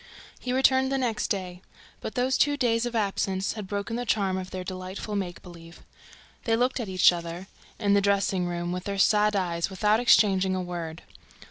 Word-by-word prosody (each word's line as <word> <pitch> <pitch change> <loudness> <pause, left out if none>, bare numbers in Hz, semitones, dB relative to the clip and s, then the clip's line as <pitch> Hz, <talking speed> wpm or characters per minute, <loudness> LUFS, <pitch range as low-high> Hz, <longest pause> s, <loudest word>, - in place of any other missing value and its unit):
He 250 - -4
returned 265 0 +3
the 270 - +1
next 240 -5 -1
day. 185 -3 -4 0.4
But - - -6
those 255 +1 +1
two 290 0 +2
days 240 -2 +1
of 240 - -6
absence 195 -2 -1
had 210 -3 -7
broken 205 +4 -3
the 245 - -2
charm 195 -3 +1
of 185 0 -5
their 185 -1 -5
delightful 185 +3 -6
make 180 -3 -4
believe. 170 -1 -13 0.6
They 225 - +2
looked 250 +3 +1
at 225 -5 -4
each 185 -1 +5
other, 170 +1 -6 0.3
in 205 -2 +1
the 200 - +4
dressing 195 -2 +1
room, 175 0 -3
with 180 0 -4
their 200 -1 -3
sad 210 +1 +3
eyes, 170 -3 -1
without 210 +3 +2
exchanging 195 -6 +4
a - - -1
word. 170 -2 -6
195 Hz, 195 wpm, -26 LUFS, 180-225 Hz, 0.6 s, each